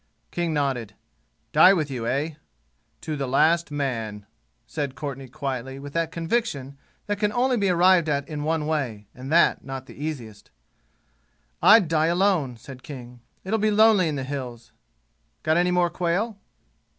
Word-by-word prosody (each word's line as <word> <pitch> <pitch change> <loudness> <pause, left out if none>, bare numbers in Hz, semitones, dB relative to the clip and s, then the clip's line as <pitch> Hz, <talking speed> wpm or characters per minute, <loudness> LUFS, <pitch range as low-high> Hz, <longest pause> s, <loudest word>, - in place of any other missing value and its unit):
King 175 -1 -1
nodded. 130 -8 -1 0.6
"Die 180 +5 +7
with 155 -6 -1
you, 120 -3 -3
eh?" 140 +6 0 0.7
"To 155 - -4
the 140 -2 -3
last 165 +6 +3
man," 115 -8 -3 0.4
said 140 +2 -4
Courtenay 135 -3 -6
quietly 135 0 -5
with 140 +1 -9
that 165 -1 -1
conviction 165 - -2 0.3
that 205 -1 -2
can 210 -1 +1
only 250 +3 +2
be 200 -4 +1
arrived 180 -2 +4
at 140 -1 -1
in 150 -2 -5
one 155 0 0
way, 130 -10 -2
and 130 +3 -8
that 170 +1 +4
not 135 -1 -6
the - - -13
easiest. 120 -9 -6 1.1
"I'd 210 -4 +7
die 160 0 +2
alone," 170 - +1
said 130 +3 -11
King. 125 -3 -10 0.2
"It'll 220 +4 -1
be 215 +1 +2
lonely 210 -3 +5
in 155 - -2
the 135 - -3
'Hills.' 125 -4 -6 0.7
Got 155 +1 +2
any 175 +1 +3
more 180 -1 +2
quail?" 195 +5 -1
150 Hz, 160 wpm, -24 LUFS, 135-175 Hz, 1.1 s, Die